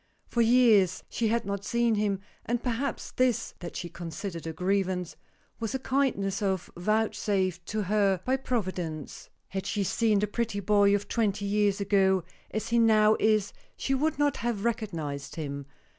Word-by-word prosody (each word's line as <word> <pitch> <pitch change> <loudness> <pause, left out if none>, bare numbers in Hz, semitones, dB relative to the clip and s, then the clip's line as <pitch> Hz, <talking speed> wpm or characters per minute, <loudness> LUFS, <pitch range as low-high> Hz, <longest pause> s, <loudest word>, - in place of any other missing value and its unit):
For 235 - 0
years 225 -6 +4
she 230 - 0
had 230 0 0
not 200 0 -3
seen 235 +1 +1
him, 205 -2 0 0.2
and 240 0 -2
perhaps 250 +3 -2
this 250 -3 +1
(that 175 -1 -7
she 175 - -4
considered 170 0 -6
a - - -2
grievance) 185 0 -1 0.4
was 230 +2 -2
a - - +2
kindness 255 -8 0 0.4
vouchsafed 195 -2 0
to 215 0 -1
her 200 -1 +2
by 260 +1 +2
Providence. 185 - -4 0.2
Had 190 0 -4
she 205 -2 0
seen 215 +2 +2
the 205 - +2
pretty 220 0 -2
boy 200 0 +4
of 205 - -3
twenty 205 -3 0
years 205 0 +2
ago 190 -2 +3 0.3
as 215 +1 -3
he 235 0 +3
now 215 -1 +5
is 215 -2 +2 0.2
she 270 - -1
would 300 +4 +1
not 290 0 +2
have 230 -3 -2
recognized 165 -12 -3
him. 140 -3 -5
205 Hz, 160 wpm, -28 LUFS, 190-230 Hz, 0.4 s, now